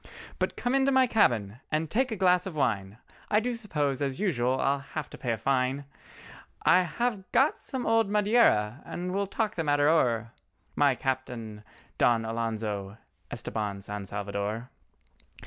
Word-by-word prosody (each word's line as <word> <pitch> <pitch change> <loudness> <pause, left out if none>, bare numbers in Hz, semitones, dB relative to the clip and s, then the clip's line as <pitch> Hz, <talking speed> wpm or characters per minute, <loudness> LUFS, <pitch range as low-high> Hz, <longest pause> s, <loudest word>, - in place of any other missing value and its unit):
"But - - -1
come 245 +1 -1
into 270 0 +3
my 260 -1 +5
cabin 120 - +2
and 155 +1 0
take 250 - 0
a - - -1
glass 180 -2 +3
of 180 - -6
wine, 105 -8 -1 0.3
I 210 - +4
do 245 +3 -2
suppose 150 - -1
as 135 0 -2
usual, 130 -10 +1
I'll 140 +1 +1
have 145 +1 -6
to - - -9
pay 125 -3 -1
a 115 - 0
fine; 130 +4 0 0.8
I 185 - +6
have 200 +2 -2
got 270 +5 +4
some 260 -3 -4
old 225 -2 +3
Madeira 205 - +3
and 180 +1 -5
we'll 200 +1 0
talk 215 +1 -1
the 165 - -2
matter 145 -1 +3
o'er— 120 -8 +2 0.4
My 140 -3 +4
Capitan 120 -5 -4 0.4
Don 115 -2 +3
Alonzo 110 -3 -3 0.3
Estabán 100 -2 -4
San 105 -1 -6
Salvador." 100 +4 -4
140 Hz, 160 wpm, -28 LUFS, -, 0.8 s, I